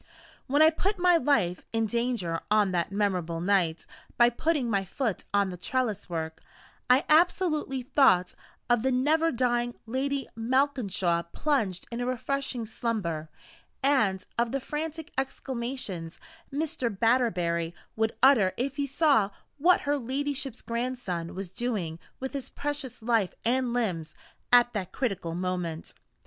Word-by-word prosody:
When 290 +3 +5
I 315 - +7
put 395 +6 -1
my 355 -1 +5
life 225 - +1
in 225 0 +1
danger 230 -7 -1
on 210 -2 +3
that 175 0 -1
memorable 185 -5 0
night, 175 -3 +1 0.3
by 240 0 +6
putting 295 0 0
my 200 -4 +1
foot 220 +2 -3
on 200 -2 +2
the 180 - -7
trellis 225 +1 -2
work, 160 -1 -4 0.5
I 255 +3 +5
absolutely 305 -5 +2
thought 210 -9 +4 0.3
of 240 -2 +3
the 265 +2 +1
never 310 +6 +3
dying 240 -1 0
Lady 270 +4 -2
Malkinshaw 225 - 0
plunged 220 - 0
in 235 +1 -3
refreshing 255 0 -2
slumber, 190 -9 -3 0.5
and 215 -10 +2
of 235 -1 +1
the 275 - 0
frantic 315 +3 -5
exclamations 240 -10 -4 0.3
Mr. 295 -3 -1
Batterbury 180 -7 +1 0.2
would 220 0 0
utter 230 -9 +6
if 275 +3 -2
he 285 -1 0
saw 275 -8 +3 0.3
what 355 +5 +5
her 290 0 0
ladyship's 270 0 -3
grandson 230 -9 -3
was 190 -2 -6
doing 190 -10 -2 0.2
with 265 +1 -4
his 270 -2 -5
precious 285 -5 -5
life 225 -5 +1
and 250 +1 +2
limbs 180 -10 -2 0.4
at 240 0 +6
that 195 -5 -3
critical 195 -10 -2
moment. 180 -3 -3
240 Hz, 135 wpm, -28 LUFS, 190-275 Hz, 0.5 s, I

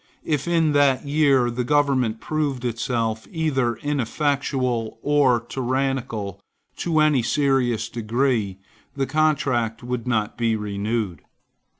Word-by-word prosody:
If, 150 -1 -1
in 165 -3 +2
that 145 -2 +3
year, 140 -4 +3
the 125 +1 -2
government 130 -5 +1
proved 145 -5 -2
itself 115 -1 -2
either 135 -7 0
inefficient 140 0 -1 0.4
or 145 -5 +3
tyrannical, 130 -5 -2 0.4
to 165 -2 0
any 150 -4 +4
serious 125 -4 +1
degree, 115 -3 -1 0.4
the 135 -1 0
contract 140 -7 0
would 125 -1 -4
not 110 -2 -1
be 115 -1 +2
renewed. 105 -1 -2
130 Hz, 110 wpm, -23 LUFS, 115-145 Hz, 0.4 s, any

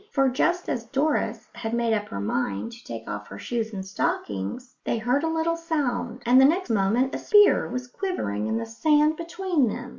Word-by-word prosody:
For 270 -2 +3
just 345 +8 0
as 235 -2 -2
Doris 265 -4 0
had 225 0 -3
made 235 -1 +1
up 210 -1 -1
her 100 - -5
mind 100 - -2
to 235 +1 -13
take 115 -1 -7
off 105 0 -5
her 100 - -9
shoes 225 - -3
and 190 -3 -5
stockings, 190 - -3
they - - 0
heard 245 +6 +1
a - - +1
little 325 +1 0
sound, 320 -7 -2
and 250 +2 +6
the - - +8
next 340 0 +2
moment 225 +6 +2
a - - -2
spear 415 -1 +5
was 250 +1 -4
quivering 245 - -3
in 110 0 0
the 115 - -3
sand 300 - +3
between 335 -3 0
them. 245 +3 -4
245 Hz, 205 wpm, -25 LUFS, 205-310 Hz, -, the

